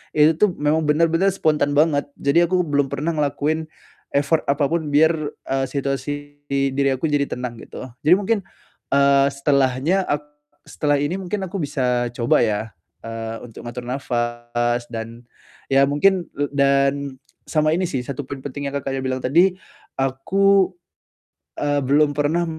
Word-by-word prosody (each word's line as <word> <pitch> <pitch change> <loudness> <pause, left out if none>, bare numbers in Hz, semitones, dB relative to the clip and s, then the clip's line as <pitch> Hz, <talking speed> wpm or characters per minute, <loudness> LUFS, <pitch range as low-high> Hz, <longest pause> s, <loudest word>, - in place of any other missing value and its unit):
itu 150 +1 +6
tuh 205 -4 +3
memang 150 +1 +1
bener-bener 165 +4 +3
spontan 155 -6 +1
banget. 145 -2 +3 0.2
Jadi 170 +5 +4
aku 180 0 +2
belum 145 -3 +1
pernah 155 +5 -2
ngelakuin 155 +1 -1 0.5
effort 145 +3 +1
apapun 150 +3 +1
biar, 155 +3 +4 0.4
eee, 135 0 +1
situasi 140 0 -2 0.4
di 135 -1 0
diri 135 0 +1
aku 150 +4 -2
jadi 140 -1 +1
tenang, 125 -2 -5
gitu. 130 - -9 0.2
Jadi 180 - +8
mungkin, 205 +2 0 0.5
eee, 140 0 +4
setelahnya 140 +6 +1
ak 145 0 -1 0.4
setelah 145 -1 0
ini 145 +7 -1
mungkin 190 +1 -3
aku 195 +2 -5
bisa 125 -3 0
coba 120 0 +2
ya, 110 -1 -2 0.3
eee, 115 0 -5
untuk 115 - -12
ngatur 120 +1 -7
nafas 120 -1 -1
dan 115 +1 -7 0.5
ya 135 +1 +5
mungkin 175 +4 +2
le 145 0 -2
dan 140 0 +3 0.5
sama 155 -1 +2
ini 180 +2 +1
sih, 130 -5 -3
1 140 +1 -6
poin 135 -2 -7
penting 145 0 -5
yang 140 - -5
Kakaknya 135 -1 -2
bilang 130 -1 -3
tadi, 175 +8 +4 0.4
aku, 190 +9 +2 0.8
eee, 145 -1 0
belum 145 +2 +3
pernah 150 +4 +1
145 Hz, 150 wpm, -21 LUFS, 130-160 Hz, 0.8 s, Jadi